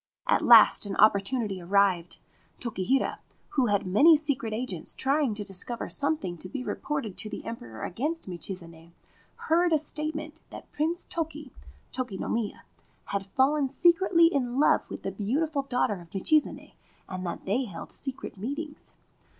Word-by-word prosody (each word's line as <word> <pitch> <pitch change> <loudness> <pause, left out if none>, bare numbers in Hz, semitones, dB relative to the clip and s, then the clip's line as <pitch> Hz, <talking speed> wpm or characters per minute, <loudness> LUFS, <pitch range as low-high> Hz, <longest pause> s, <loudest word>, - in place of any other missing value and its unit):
At - - +2
last - - +7
an 195 - -4
opportunity 205 -1 +2
arrived. 180 -2 +1 0.4
Tokihira, 240 +3 -1 0.3
who 260 -4 +1
had 205 -2 +1
many 285 - +6
secret 275 -7 -1
agents 215 -7 -3
trying 275 -4 +1
to 205 - -4
discover 200 +4 -3
something 280 - -1
to 185 - -4
be 255 - -5
reported 265 -8 -4
to 215 - -5
the - - -7
Emperor 115 - -7
against 300 - -3
Michizane, 170 -2 -7 0.5
heard 340 +2 +3
a 315 - +5
statement 310 +1 -4
that - - -11
Prince 325 +4 -1
Toki 325 -1 -4 0.4
(Toki 245 -7 -4
no - - -4
Miya) 225 -3 -2 0.5
had 195 -1 -2
fallen 270 +6 +2
secretly 340 +3 +4
in 260 -6 +1
love 300 - +4
with - - -7
the 195 - -2
beautiful 280 - -1
daughter 245 -8 -1
of 170 - -15
Michizane, 300 +10 +1 0.3
and 185 -1 -6
that 175 - -5
they 235 +7 0
held 175 -7 -9
secret 265 -6 -4
meetings. 290 +8 -6
245 Hz, 150 wpm, -27 LUFS, 195-300 Hz, 0.5 s, last